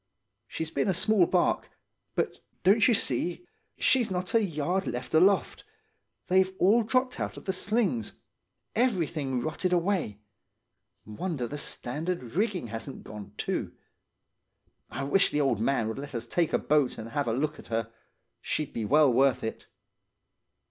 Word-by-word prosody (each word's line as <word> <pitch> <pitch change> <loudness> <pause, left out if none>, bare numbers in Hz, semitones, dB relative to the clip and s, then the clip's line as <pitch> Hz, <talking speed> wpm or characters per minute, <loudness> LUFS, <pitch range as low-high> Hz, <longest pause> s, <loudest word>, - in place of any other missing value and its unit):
She's 160 +5 -4
been - - 0
a 190 - +2
small 205 -1 +3
barque; 180 -2 +1 0.5
but, - - -1 0.2
don't 205 +4 +5
you 240 - +4
see, 175 - -1 0.3
she's 245 -4 +3
not 180 -1 -3
a 225 -1 +4
yard 180 +2 -1
left 125 +3 -4
aloft. 190 +5 +3 0.6
They've 185 +1 +3
all 210 +6 +5
dropped 255 +3 0
out - - -3
of - - -10
the 190 - 0
slings; 195 - -1 0.6
everything 165 - 0
rotted 160 +7 -2
away; 175 - 0 0.9
wonder 130 - -3
the 145 +4 -5
standing 150 +1 -4
rigging 190 - -1
hasn't 115 +6 -6
gone, 105 -1 -9
too. - - -2 1.2
I 140 - -4
wish 170 +8 +3
the 150 - 0
old 135 -6 +1
man 115 -1 +1
would 110 +3 -4
let 140 -2 -7
us 115 - -3
take 170 -3 +1
the - - +2
boat 150 -3 +1
and 115 +1 -7
have 145 +2 -1
a - - +1
look 150 +5 -1
at - - -12
her. 115 0 -2 0.5
She'd 155 -2 -2
be 115 - -2
well 145 +2 +5
worth 135 +1 +3
it. 110 - -5
155 Hz, 155 wpm, -28 LUFS, 125-190 Hz, 1.2 s, don't